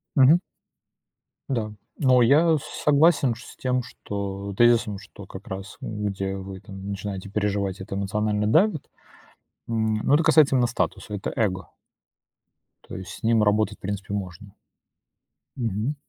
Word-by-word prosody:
Мгм. 145 +4 +6 1.1
Да, 110 -5 -2 0.2
но 130 -3 +4
я 155 +7 +5 0.3
согласен 145 -4 +4
с 120 - -12
тем 125 -1 0 0.8
тезисом, 120 -3 +4
что 105 -1 -12
как 95 +1 -11
раз, 95 +1 -7
э, - - -6
где 100 -2 -3
вы 95 0 -8
там 95 0 -9
начинаете 100 0 -5
переживать, 100 -2 -1
это 95 0 -6
эмоционально 105 +1 0
давит, 160 - +2 0.8
м. 110 -1 0
Ну, - - +2
это 155 +3 +5
касается 150 -3 +5
именно 125 -2 +3
статуса. 120 -3 -3
Это 100 - -4
эго. 95 -5 -1 1.2
То - - -7
есть 95 - -8
с - - -11
ним 115 -1 +3
работать, 105 0 +2
в - - -45
принципе, 100 0 -4
можно. 95 0 -6 1.0
Мгм. 115 +3 -2
105 Hz, 140 wpm, -25 LUFS, 100-125 Hz, 1.2 s, Мгм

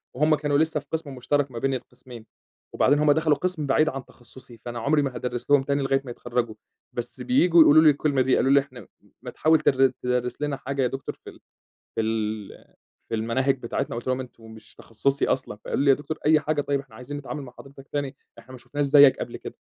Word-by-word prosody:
وهم 155 +3 +3
كانوا 145 -1 0
لسه 155 0 +1
في - - -17
قِسم 155 -4 -4
مشترك 140 +2 -1
ما 115 - -6
بين 135 +1 0
القِسمين. 120 -2 -9 0.5
وبعدين 145 +2 +3
هم 150 -1 +4
دخلوا 155 0 +3
قِسم 180 -3 -2
بعيد 155 +3 +3
عن 135 -1 -6
تخصصي، 120 -1 -15
فأنا 120 -1 -5
عمري 145 +5 +2
ما 135 -3 -3
هادرِّس 125 +2 -4
لهم 140 -2 +5
تاني 140 0 -1
لغاية 135 0 +1
ما 125 - -6
يتخرجوا. 120 -2 -3 0.4
بس 120 0 -5
بييجوا 180 -10 +4
يقولوا 155 +1 +7
لي 155 - +7
الكلمة 145 -2 +1
دي. 130 0 +3
قالوا 135 - +2
لي: 140 - +7
"إحنا 130 -3 -8
م - - -15 0.4
ما - - -7
تحاول 160 +1 +3
تر 135 0 +4
تدرِّس 125 +1 -2
لنا 145 -2 -2
حاجة 135 0 -3
يا 125 - +2
دكتور 135 +2 -6
في - - -9
ال - - -15 0.6
في - - +1
ال 110 -2 -4 0.4
في 115 - -1
المناهج 130 +5 0
بتاعتنا."، 120 -1 -3
قُلت 120 - -6
لهم: 130 0 0
"أنتم 125 -3 -10
مش 110 0 -15
تخصصي 135 +5 -1
أصلًا."؛ 130 -5 -2
فقالوا 140 - -1
لي: 140 - +3
"يا 135 - +7
دكتور 155 +1 -6
أي 155 0 +5
حاجة 150 0 -1
طيب، 140 -1 -1
إحنا 135 -5 -13
عايزين 130 +5 -7
نتعامل 145 +1 -6
مع 125 - -12
حضرتك 135 0 -14
تاني، 140 -2 -3 0.2
إحنا 120 +3 -16
ما 130 - -9
شُفناش 140 +4 -3
زيك 140 -1 +6
قبل - - -5
كده.". - - -9
135 Hz, 230 wpm, -25 LUFS, 125-145 Hz, 0.6 s, يقولوا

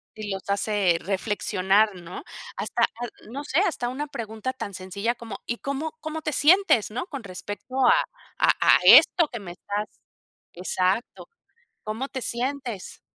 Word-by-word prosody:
Y 215 -1 -6
los 190 0 -4
hace 200 -3 +2
reflexionar, 200 +1 +1
¿no? 175 -2 -9 0.3
Hasta - - -1
a - - +6 0.4
no 280 +3 -5
sé, 295 +3 +1
hasta 245 -11 0
una 285 +4 -3
pregunta 225 0 -5
tan 205 -6 -6
sencilla 200 +6 -2
como, 225 -4 -8
¿y 235 - -2
cómo 300 +3 -4
cómo 315 0 -5
te 305 - -2
sientes, 310 - +4
no? 255 - -4
Con 275 -5 -7
respecto 205 +6 -7
a 470 - +7 0.4
a - - +3
a - - +6
esto 335 -4 +8
que 235 - -6
me 180 -3 -8
estás 205 +3 -4 0.7
exacto. 185 +5 -1 0.6
¿Cómo 220 +5 -3
te 260 - -5
sientes? 245 -4 -3
225 Hz, 155 wpm, -25 LUFS, 200-275 Hz, 0.7 s, esto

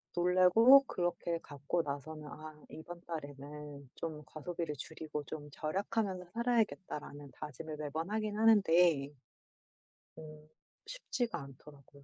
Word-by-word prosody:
놀래고 185 +10 +7
그렇게 175 -1 -1
갚고 145 +4 -1
나서는 150 +2 -5
'아 155 +1 -9
이번 170 +3 -9
달에는 145 -2 -7
좀 155 -2 -5
과소비를 155 +2 -4
줄이고 155 0 -5
좀 150 0 -7
절약하면서 190 +5 -1
살아야겠다.'라는 200 - -1
다짐을 155 +1 -7
매번 155 +3 -3
하긴 215 -1 -1
하는데 175 -9 +5 1.1
어 155 -1 -11 0.4
쉽지가 250 - -2
않더라고요. 140 +1 -14
160 Hz, 285 characters per minute, -34 LUFS, 150-180 Hz, 1.1 s, 놀래고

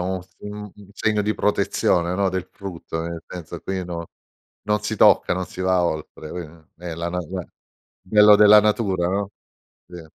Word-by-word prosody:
un 95 +1 -2
f 95 +1 -26 0.4
un 100 -1 -16
segno 105 0 0
di 105 +1 0
protezione, 90 -4 +1
no, 100 0 +2
del 95 0 -3
frutto, 90 -4 -6
nel 85 -1 -6
senso 85 -1 -8
qui 95 +2 -4
non 85 -1 -5 0.6
non 105 0 +1
si - - -3
tocca, - - +5
non 95 - -2
si 90 - -10
va 95 -1 +2
oltre 80 -1 -4
qui 90 - -5 0.4
è 85 -2 -5
la 85 +1 -3
na 90 - -2
beh. 90 +2 -5
Il - - -16 0.6
bello 105 +1 +6
della 105 0 +8
natura, 100 -5 +1
no, 100 +1 -1 0.6
sì. 90 -1 -10
95 Hz, 185 wpm, -22 LUFS, 85-100 Hz, 0.6 s, della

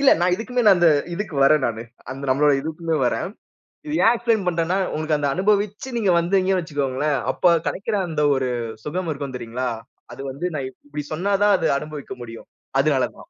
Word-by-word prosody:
இல்ல 275 - +6
நான் 180 +1 +3
இதுக்குமேல 240 +3 -1
நான் 195 - +8
அந்த 175 - +6 0.3
இதுக்கு 195 -3 -5
வரன் 150 -1 +4
நானு. 115 -1 -3 0.3
அந்த 135 +1 -7
நம்மளோட 145 +2 +4
இதுக்குமே 160 +1 -2
வரன். 180 - -1 0.6
இது 300 - -2
ஏன் 230 - +6
எக்ஸ்பிலைன் 230 -4 0
பண்றன்னா 170 +1 +1 0.2
உங்களுக்கு 155 0 0
அந்த 145 - 0
அனுபவிச்சு 205 - 0
நீங்க 205 -5 +2
வந்தீங்க 190 +2 +2
வச்சுக்கோங்களேன். 145 -2 -1
அப்ப 175 -2 +3
கெடைக்கிற 205 +2 -2
அந்த 155 -2 0
ஒரு 130 -1 0 0.4
சுகம் 175 +3 -3
இருக்கும் 140 -2 -6
தெரியுங்களா? 125 +1 -3 0.4
அது - - -9
வந்து 145 +7 -3
நான் 135 -3 -3
இப்டி 145 +2 -8
சொன்னாதான் 200 +4 +2
அது - - +1
அனுபவிக்க 150 -2 -7
முடியும். 115 -1 -10 0.3
அதனாலதான். 145 - -1
165 Hz, 170 wpm, -22 LUFS, 140-195 Hz, 0.6 s, நான்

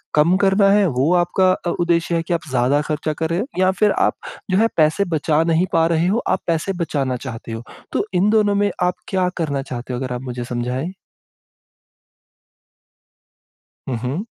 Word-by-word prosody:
कम 155 +4 +4
करना 195 0 +4
है 205 0 +4
वो 135 +4 +1
आपका 185 +1 +3
अ, 175 - -2
उद्देश्य 170 0 +1
है 165 - +1
कि 175 - -2
आप 170 -1 -3
ज़्यादा 130 +3 +2
ख़र्चा 155 0 -2
कर 160 +2 -3
रहे 170 - 0
हो? 215 - -1
या 185 0 +4
फिर 205 +3 +2
आप - - +2 0.4
जो 185 - +3
है 215 - +4
अ, - - +4
पैसे 155 +5 +3
बचा 155 +1 +2
नहीं 165 +2 +2
पा 165 0 +4
रहे 170 +1 +1
हो, 205 +5 +2
आप 190 - +1
पैसे 170 +3 0
बचाना 135 -5 -1
चाहते 115 0 -8
हो? 115 +1 -5 0.3
तो - - 0
इन 185 +3 +3
दोनों 210 -2 +3
में 205 0 +2
आप 180 0 +2
क्या 185 -2 +1
करना 145 -5 -1
चाहते 125 -1 -6
हो 120 - -3
अगर 130 -2 -3
आप 125 - -4
मुझे 125 -2 -5
समझाएँ? 125 +6 -3 3.0
हुँ, 130 - -1
हुँ। 140 +11 -2
165 Hz, 195 wpm, -20 LUFS, 135-185 Hz, 3.0 s, कम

